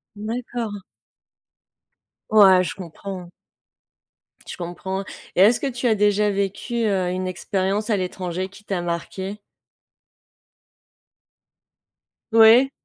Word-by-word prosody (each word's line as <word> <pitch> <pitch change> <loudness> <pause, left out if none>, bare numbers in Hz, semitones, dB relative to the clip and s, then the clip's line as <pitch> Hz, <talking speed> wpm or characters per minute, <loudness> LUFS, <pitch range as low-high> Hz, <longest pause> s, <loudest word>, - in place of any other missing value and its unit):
D'accord. 225 -1 -4 1.5
Ouais 190 -4 +7
je - - -3
comprends. 185 0 -8 1.2
Je - - -7
comprends 185 +2 -4 0.3
et - - +4
est 205 +4 +8
ce 240 - -2
que 280 - -2
tu 245 -1 -2
as 220 - +3
déjà 210 0 +2
vécu, 200 +4 -2
heu, 190 -3 +1
une 185 0 -3
expérience 195 +3 -2
à 210 - +2
l'étranger 185 0 -3
qui 200 +2 -16
t'a 190 -4 -2
marquée? 190 +4 -4 2.9
Oui. 230 +4 +7
200 Hz, 105 wpm, -22 LUFS, 185-220 Hz, 2.9 s, est